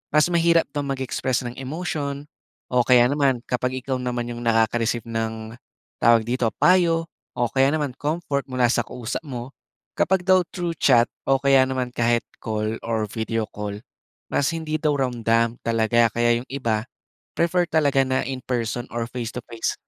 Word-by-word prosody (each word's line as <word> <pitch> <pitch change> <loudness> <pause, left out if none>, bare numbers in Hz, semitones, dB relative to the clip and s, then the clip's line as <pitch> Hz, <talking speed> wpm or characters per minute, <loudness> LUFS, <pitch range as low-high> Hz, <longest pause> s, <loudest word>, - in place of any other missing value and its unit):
mas 150 +4 +4
mahirap 170 -1 +4
bang 145 -1 -3
mag-express 130 -1 -1
ng 120 +1 -6
emotion, 145 -1 -4 0.4
o 125 -1 +2
kaya 125 -1 +5
naman 140 -3 +1
kapag 125 +1 -1
ikaw 130 0 -3
naman 125 -1 -3
yung 120 0 -6
nakaka-receive 115 0 +1
ng, 110 0 -4 0.5
tawag 115 -1 +5
dito, 120 -2 0
payo 170 -2 +4 0.2
o 120 0 0
kaya 135 +3 +2
naman 145 -5 -2
comfort 145 -1 -2
mula 125 -2 +1
sa 120 - +1
kausap 125 +4 -5
mo, 130 -2 -7 0.4
kapag 185 +1 +1
daw 185 -1 +5
through 175 -2 -3
chat 120 -5 +4 0.2
o 135 -1 +2
kaya 135 -1 +5
naman 130 -1 -3
kahit 120 0 +1 0.2
call 110 0 -2
or 110 -2 -1
video 110 +1 -2
call, 105 0 -5 0.6
mas 145 +3 +1
hindi 160 -1 -3
daw 155 -1 +1
ramdam 115 -2 +1
talaga. 115 0 +2
Kaya 120 +1 +2
yung - - -26
iba 115 -5 -1 0.5
prefer 175 +1 +2
talaga 140 -5 +2
na 130 0 +1
in-person 125 -2 -3
or 120 0 -3
face 120 -2 -5
to 125 - -5
face 115 -1 -2
125 Hz, 165 wpm, -23 LUFS, 115-145 Hz, 0.6 s, kaya